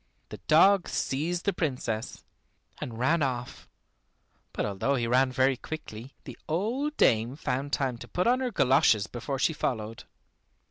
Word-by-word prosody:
The - - -9
dog 190 +4 +5
seized 165 +7 -2
the 200 - +1
Princess, 125 -9 -3 0.6
and 115 -3 -6
ran 155 +7 +2
off; 125 -3 -3 0.8
but - - -2
although 105 +7 -1
he 120 -3 -1
ran 130 +2 +3
very 130 +1 +2
quickly, 130 -4 -8
the 125 - -10
old 240 - -1
dame 115 +3 +3
found 140 -1 -3
time 130 -5 -1
to - - -9
put 180 - -1
on 250 +2 +3
her 260 -1 -1
goloshes 135 - +3
before 125 +5 -5
she 150 +5 +1
followed. 115 -6 -3
135 Hz, 150 wpm, -28 LUFS, 120-165 Hz, 0.8 s, dog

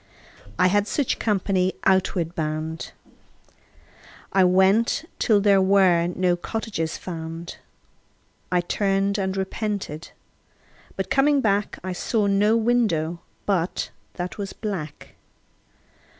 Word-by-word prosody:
I - - +4
had 205 +3 +3
such 280 0 -1
company 190 -3 +1
outward 185 -3 +2
bound. 155 0 -3 1.4
I 190 - +5
went 190 - +3
till 215 -3 +4
there 200 -1 +4
were 190 -3 +4
no 180 0 +1
cottages 175 -3 -3
found. 165 -1 -7 0.9
I 180 -1 +3
turned 195 +2 0
and 190 0 -2
repented, 190 -5 -3 0.9
but - - -4
coming 285 +1 +4
back 205 -4 0
I 185 0 -3
saw 210 +3 0
no 205 +3 +3
window 215 -9 +1 0.3
but 185 -3 -1 0.2
that 180 +3 -5
was 195 -1 -4
black. 180 -9 -6
190 Hz, 105 wpm, -24 LUFS, 175-205 Hz, 1.4 s, I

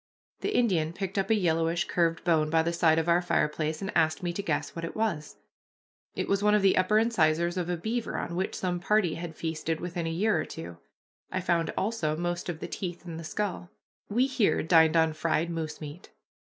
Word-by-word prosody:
The 410 - -1
Indian 170 -9 +2
picked 195 +2 -3
up 195 - -1
a 225 - +5
yellowish 165 -3 +1
curved 165 -1 0
bone 160 -3 +2
by 160 0 +3
the 170 +1 -1
side 165 -2 +3
of 165 +1 0
our 170 +1 +4
fireplace 155 -1 -1
and 195 - -4
asked 160 +3 +2
me 175 -1 -1
to 200 - -3
guess 160 -7 -2
what 165 - -5
it 165 - -5
was. 170 -10 -2 0.8
It - - -2
was 200 0 +1
one 210 0 +4
of 210 - +2
the 195 - +5
upper 185 +3 +3
incisors 175 -6 +2
of 180 -2 -2
a 175 - -1
beaver, 225 +7 -3
on 170 - -4
which 190 +2 -2
some 180 -1 -1
party 190 -2 +2
had 165 -1 -6
feasted 160 0 -3
within 175 -1 -3
a - - -1
year 180 +1 +1
or - - -4
two. 85 +1 -8 0.5
I 185 - -1
found 170 -2 0
also 190 -8 -1
most 175 +1 -3
of 160 -2 -5
the - - -4
teeth 175 -2 -5
and 165 -2 -6
the - - -7
skull. 180 0 -3 0.4
We 240 +5 +3
here 235 - +1
dined 160 0 +5
on 160 -1 +3
fried 165 +1 0
moose 160 -2 -4
meat. 150 +4 -9
170 Hz, 220 wpm, -28 LUFS, 160-190 Hz, 0.8 s, a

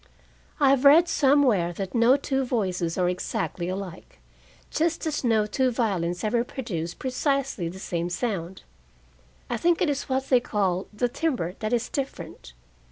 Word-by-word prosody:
I 275 -2 +5
have 275 -1 +2
read 310 +5 +7
somewhere 270 - +3
that 190 +1 -5
no 240 +3 +5
two 270 -1 -1
voices 185 -9 -1
are 180 -1 +2
exactly 180 0 -2
alike, 185 -2 -7 0.5
just 330 +1 0
as 305 -3 -2
no 225 -3 +3
two 260 +4 +1
violins 190 -8 -1
ever 230 +2 +1
produce 175 -11 -5
precisely 265 - -1
the 180 - -9
same 175 -2 -3
sound. 190 -3 -3 0.8
I - - -2
think 345 -1 +2
it 320 - +2
is 280 -1 -4
what 265 0 -1
they 255 - +5
call 195 -6 -1
the 220 +4 0
timbre 245 - -2
that 215 0 -3
is 240 0 0
different. 170 - -6
230 Hz, 160 wpm, -25 LUFS, 180-270 Hz, 0.8 s, read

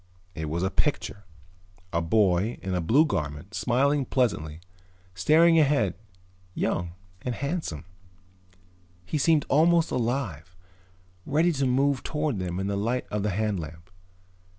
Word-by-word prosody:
It 80 -2 -4
was 85 +3 -2
a 95 - 0
picture. 105 -8 -2 0.7
A 85 - +1
boy 95 +4 +2
in 95 -1 -3
a 90 - 0
blue 130 - +4
garment, 75 - -4
smiling 135 +7 +1
pleasantly, 90 - -1 0.5
staring 160 - +5
ahead, 135 - +2 0.6
young 85 -1 -1 0.3
and 125 -2 -3
handsome. 140 - -4 1.2
He 150 - -2
seemed 155 0 +3
almost 165 +3 +3
alive, 115 - -2 0.7
ready 160 - +2
to 140 -4 0
move 135 +1 +2
toward 150 -8 -2
them 90 0 -3
in 95 - -2
the 100 0 -1
light 115 +5 -1
of 105 - -1
the 105 - 0
hand 105 0 -1
lamp. 85 +2 -9
110 Hz, 135 wpm, -26 LUFS, 90-140 Hz, 1.2 s, staring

